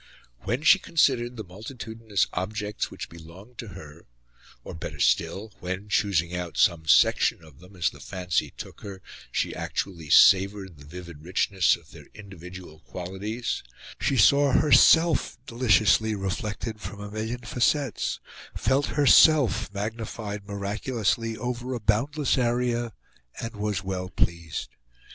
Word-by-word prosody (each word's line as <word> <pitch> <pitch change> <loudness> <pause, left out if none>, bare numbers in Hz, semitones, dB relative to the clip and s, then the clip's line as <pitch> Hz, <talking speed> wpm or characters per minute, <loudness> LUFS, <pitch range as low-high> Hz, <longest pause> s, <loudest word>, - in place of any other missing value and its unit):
When 120 +9 -1
she 190 +4 +7
considered 125 -9 +1
the 110 - -5
multitudinous 110 +2 -3
objects 105 +3 -3
which - - -7
belonged 85 +8 -14
to 115 - -6
her, 85 -5 -12 0.6
or, - - -8
better 80 - -7
still, 105 +1 0
when, 95 +3 -5
choosing 90 -5 +1
out 90 -2 -5
some 80 -3 +2
section 80 - +4
of 75 -4 -17
them 90 +3 -16
as 85 -2 0
the 70 - -15
fancy 90 +7 -2
took - - -9
her, 95 -2 -9 0.3
she - - -1
actually 85 -6 -4
savoured 95 -1 +5
the 70 - -14
vivid 85 -2 -10
richness 90 +1 +2
of 85 -3 -18
their 75 -4 -14
individual 90 -5 -11
qualities, 95 +8 -5 0.4
she 135 - 0
saw 140 +4 +5
herself 160 +4 +5
deliciously 110 -3 +3
reflected 105 +3 -4
from 100 0 -7
a 105 0 -8
million 110 +3 -4
facets, 125 +2 0 0.4
felt 135 +1 +1
herself 140 - +5
magnified 105 -1 -5
miraculously 110 +2 -2
over 125 +2 -4
a - - -4
boundless 135 +7 +1
area, 120 -1 0 0.5
and 115 0 -6
was 105 -2 -2
well 95 -1 -4
pleased. 85 -3 -2
105 Hz, 135 wpm, -26 LUFS, 90-120 Hz, 0.6 s, she